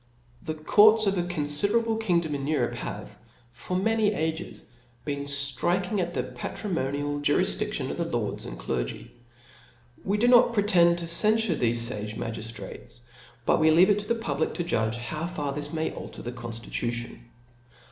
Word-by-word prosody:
The 155 - -4
courts 215 +8 +5
of 195 0 +2
a - - +2
confiderablc 200 +8 0
kingdom 170 -7 +1
in 140 -1 -3
Eu^ 155 +1 0
rope, - - -1
have, - - -6 0.4
for 120 +10 -4
many 220 +1 +2
ages, 160 +1 -3 0.4
been 140 -1 -3
ftriking 145 - 0
at 175 -1 -3
the 125 - 0
patrimonial 145 - -3
jurifditftion 145 - 0
of - - -5
the - - -1
lords - - -2
and - - -7
clergy. - - -4 0.9
We 200 +2 0
do 235 +3 +2
not 245 -1 +6
pretend 180 -5 +4
to 170 - -4
cenfure 215 +4 +3
thefe 120 -1 +1 0.2
fage 105 +1 -5
magiftrates; 115 +1 -7 0.5
bqt - - +4
we 160 0 +5
leave 175 +6 +6
it 205 - +2
to 205 - -7
the 235 - +1
public 230 0 -2
to 175 - -2
judge, 115 -9 0
how 155 +7 -4
fa^r 150 -5 -3
^.his 145 0 -3
m.ay 160 0 -2
alter - - -9
the 120 - -4
conftitution. 120 0 -5
160 Hz, 165 wpm, -26 LUFS, 130-200 Hz, 0.9 s, not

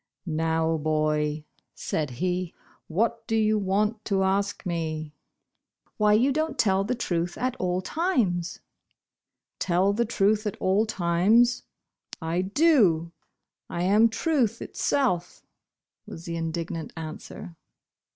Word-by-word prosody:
"Now, 160 0 0
boy," 155 0 0 0.3
said 150 -3 -2
he, 180 +6 -2 0.3
"what 225 +6 -1
do 225 - 0
you 215 -1 +2
want 210 +3 0
to 195 -2 +1
ask 200 +2 0
me 160 -3 -3 0.4
?" - - -45
"Why 210 -1 +4
you 245 +6 +4
don't 310 +2 -1
tell 195 -2 +2
the 250 +5 -1
truth 175 -6 -2
at 255 0 -1
all 180 0 -1
times 220 - -1 0.5
?" - - -63
"Tell 185 +3 +2
the 235 +3 +1
truth 215 0 +1
at 205 - -4
all 195 +4 +2
times? 215 +7 +3 0.6
I 165 +2 -1
do. 195 - +3 0.6
I 170 - -2
am 210 +5 +5
Truth 260 -2 0
itself," 180 -12 -1 0.6
was 165 - -9
the 170 - -4
indignant 165 -1 -4
answer. 160 +2 -8
190 Hz, 125 wpm, -26 LUFS, 165-220 Hz, 0.6 s, am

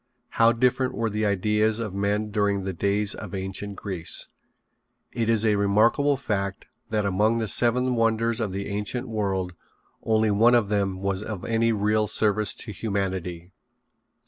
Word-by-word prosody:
How 115 0 +4
different 125 +2 +1
were 115 -1 -1
the 105 +1 0
ideas 105 +2 +1
of 110 -4 -4
men 105 +2 -1
during 100 -2 0
the 95 0 -3
days 100 +3 0
of - - -7
ancient 95 +1 -4
Greece. 95 -5 -3 0.8
It 115 -1 -1
is 115 -1 +4
a 105 -2 +3
remarkable 115 +8 +3
fact 100 -7 -3 0.2
that 105 -2 0
among 105 +4 +2
the 110 -1 -1
seven 125 +4 +2
wonders 115 0 +1
of 110 -4 -2
the 100 +1 -4
ancient 105 +5 -3
world 95 -5 -2 0.5
only 110 -1 +2
one 115 +4 +5
of 110 -4 +2
them 100 -2 -1
was 100 -1 -1
of 105 -3 -6
any 115 0 +1
real 105 0 +1
service 105 -1 +1
to 110 - -6
humanity. 95 -4 -3
105 Hz, 160 wpm, -25 LUFS, 100-115 Hz, 0.8 s, one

